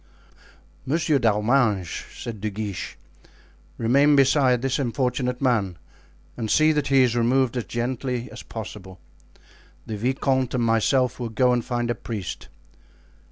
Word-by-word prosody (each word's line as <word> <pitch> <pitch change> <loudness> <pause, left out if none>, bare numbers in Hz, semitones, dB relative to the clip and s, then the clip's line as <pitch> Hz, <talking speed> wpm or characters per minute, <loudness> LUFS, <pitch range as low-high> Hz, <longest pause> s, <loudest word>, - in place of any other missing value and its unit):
"Monsieur 155 0 +1
d'Arminges," 105 -4 +1
said 115 -4 -7
De 110 - -1
Guiche, 105 -2 -5 0.8
"remain 140 +6 +4
beside 130 -2 +3
this 135 +2 0
unfortunate 125 0 -1
man 105 -9 +1 0.6
and 115 -2 -4
see 155 +6 +4
that 150 -2 0
he 135 -1 +5
is 120 -2 +1
removed 125 +1 +2
as 120 - -2
gently 125 0 -3
as - - -9
possible. 95 -4 -9 0.9
The 110 - -5
vicomte 130 +2 0
and 120 - +1
myself 120 +3 +2
will 120 -2 -3
go 125 +3 +2
and 120 -1 0
find 120 0 -2
a - - +1
priest." 105 -7 -6
125 Hz, 135 wpm, -24 LUFS, 110-130 Hz, 0.9 s, he